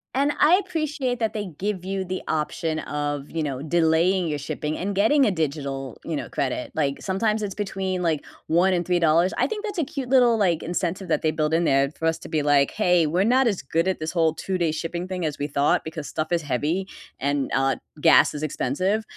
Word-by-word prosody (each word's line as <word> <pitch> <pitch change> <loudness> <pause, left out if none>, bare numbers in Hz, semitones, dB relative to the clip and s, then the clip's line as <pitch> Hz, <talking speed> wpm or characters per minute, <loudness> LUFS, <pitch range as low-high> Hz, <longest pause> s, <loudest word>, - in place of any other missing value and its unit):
And 280 +2 +2
I 315 +4 +6
appreciate 300 -7 -2
that 225 -2 0
they 210 -2 -3
give 200 -2 -2
you 190 0 -3
the 185 +1 -4
option 155 +1 -1
of, 145 -1 -3
you 165 -1 -2
know, 135 -3 -3
delaying 170 +3 +2
your 150 -1 -2
shipping 150 +2 -4
and 200 +2 -3
getting 265 +8 +4
a 210 - +3
digital, 140 -6 -3
you 165 - -2
know, - - -4
credit, 130 -2 -2
like, 140 -3 -1
sometimes 210 +3 0
it's 200 -2 -3
between, 190 -2 -3
like, 160 -4 0 0.3
1 175 +4 +3
and 175 -1 0
$3. 175 0 +3
I - - +3
think 440 -1 -4
that's 410 -2 -5
a 330 - +2
cute 275 -2 -5
little, 245 -3 +5
like, 175 -6 +1
incentive 180 +2 -3
that - - +1
they 155 - +1
build 155 0 -1
in 170 +1 +2
there 135 -1 +3
for 160 - -6
us 165 0 +2
to - - -10
be, 155 -2 0
like, 145 -1 +3
hey, 180 -5 +3
we're 180 +6 +1
not 255 +3 +4
as 205 -6 0
good 165 +6 0
at 190 - -2
this 155 +1 -4
whole 165 -3 +2
2 185 +3 -3
day 170 -3 +1
shipping 170 +2 -4
thing 185 -2 -3
as 150 -2 -2
we 145 - -2
thought, 140 0 +1
because 160 -2 -6
stuff 155 +4 -3
is 170 -1 +2
heavy 150 +8 -1 0.3
and, 140 0 -1
uh, 135 -1 +2 0.2
gas - - +5
is 150 - -5
expensive, 185 - -1
170 Hz, 225 wpm, -24 LUFS, 150-195 Hz, 0.3 s, I